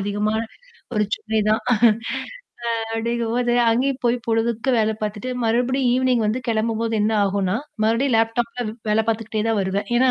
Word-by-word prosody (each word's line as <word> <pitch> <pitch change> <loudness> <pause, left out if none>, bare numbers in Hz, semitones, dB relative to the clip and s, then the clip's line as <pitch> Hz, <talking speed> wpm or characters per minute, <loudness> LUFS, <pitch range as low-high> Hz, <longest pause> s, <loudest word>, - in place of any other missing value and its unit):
அதிகமா 205 +2 -1 0.6
ஒரு 210 -1 +2
சுமை 220 0 -2
தான் 215 +2 +3
ஆ - - +6 1.2
அப்பிடிங்கம்போது, 235 +1 0 0.2
அங்கேயும் 260 +3 0
போய் 240 0 +3
பொழுதுக்கு 230 +2 0
வேல 220 -1 +2
பார்த்துட்டு, 215 +4 -3
மறுபடியும் 250 +3 +1
ஈவினிங் 255 -2 +2
வந்து 215 +4 0
கிளம்பும்போது 225 0 0
என்ன 215 +2 +2
ஆகுன்னா, 195 0 0 0.3
மறுபடியும் 230 +4 +2
லேப்டாப்ல 230 +2 0 0.2
வேல 215 +1 +3
பார்த்துக்கிட்டே 220 -1 -1
தான் 225 -2 +1
வருவேன். 195 +2 -1
ஏன்னா, 255 +1 +4
225 Hz, 145 wpm, -22 LUFS, 215-240 Hz, 1.2 s, ஆ